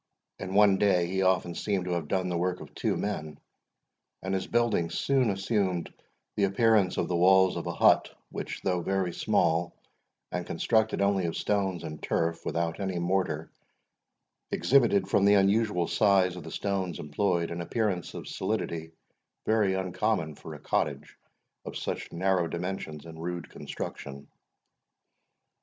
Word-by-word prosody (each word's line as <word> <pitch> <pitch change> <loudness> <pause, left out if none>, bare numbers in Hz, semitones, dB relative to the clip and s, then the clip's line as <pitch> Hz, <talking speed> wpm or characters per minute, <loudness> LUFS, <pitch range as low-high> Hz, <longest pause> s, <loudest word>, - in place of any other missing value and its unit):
In 95 0 -5
one 100 -2 +5
day 95 -4 +3
he 95 +2 -1
often 95 -2 +2
seemed 95 0 -1
to 90 - -3
have 85 -3 -2
done 95 +1 0
the 90 - -2
work 90 +1 -1
of - - -11
two - - -1
men, 80 -7 -4 0.8
and 95 +1 -2
his 95 - -1
building 115 -8 +1
soon 130 +6 +1
assumed 95 -3 -1 0.4
the 100 - +3
appearance 100 -1 +3
of - - 0
the 90 - -1
walls 95 +2 +5
of - - -4
a - - -1
hut, - - +4 0.2
which, - - -5
though 90 -2 0
very 95 -1 -1
small, 85 -5 +1 0.6
and 90 -1 -3
constructed 110 +3 +1
only 100 -2 +2
of 85 - -3
stones 95 -4 -1
and 75 0 -7
turf, 85 0 -1
without 85 +1 -1
any 95 -2 -2
mortar, 85 -3 -1 1.0
exhibited, 115 -8 +3
from 100 - +2
the 100 +1 +6
unusual 100 -2 +2
size 95 -4 +3
of 90 - -7
the - - -9
stones 95 -3 -2
employed, 85 +3 -1
an 85 0 -4
appearance 95 0 -2
of - - -7
solidity 80 0 -3 0.5
very 105 -3 +2
uncommon 95 -2 -1
for - - -10
a - - -10
cottage - - -2 0.5
of - - -6
such - - -4
narrow 90 0 +1
dimensions 85 -4 -5
and 80 -1 -10
rude 85 0 -4
construction. 70 0 -7
95 Hz, 155 wpm, -28 LUFS, 85-100 Hz, 1.0 s, the